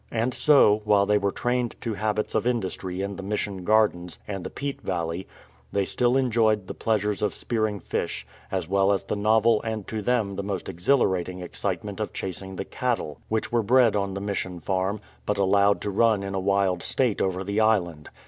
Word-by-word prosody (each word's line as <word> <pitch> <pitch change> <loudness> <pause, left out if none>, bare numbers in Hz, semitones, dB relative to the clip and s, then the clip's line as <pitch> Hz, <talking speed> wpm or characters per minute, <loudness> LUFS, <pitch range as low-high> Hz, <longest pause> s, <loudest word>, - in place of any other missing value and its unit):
And 120 +2 -1
so, 115 -9 +5
while 105 -1 +4
they 105 0 +3
were 100 0 0
trained 120 +1 -1
to 115 - -2
habits 105 0 -1
of - - +1
industry 95 -5 -2
in 100 -1 -4
the - - -5
JVIission 100 -2 -3
gardens 105 -5 +2
and 100 -3 -4
the - - -5
peat 140 -1 -5
valley, 85 0 -3 0.4
they 100 -1 +1
still 125 +4 +2
enjoyed 110 -5 +2
the - - -6
pleasures 105 -2 0
of 105 - 0
spearing 110 -3 -1
fish, - - -3 0.3
as 95 -4 -2
well 95 +2 +3
as 100 - +1
the - - -3
novel 110 +2 +3
and 110 -3 -4
to 110 -1 -3
them 105 -3 0
most 95 -3 -4
exhilarating 90 -2 +1
excite 90 0 -3
ment 105 0 -7
of 105 - -3
chasing 95 +1 -5
the 95 - -4
cattle, 115 - -2
which 110 0 -1
were 120 -1 +3
bred 120 0 +4
on 100 -1 -1
the 100 - -4
Mission 95 -3 -3
farm, 95 +4 -1 0.3
but 105 - 0
allowed 100 +1 +3
to 105 - -2
run 110 0 +3
in 100 0 -4
a 95 - -1
wild 95 -2 +1
state 125 -6 0
over 95 0 0
the 100 +2 -1
island. 90 -9 +1
100 Hz, 195 wpm, -25 LUFS, 95-110 Hz, 0.4 s, so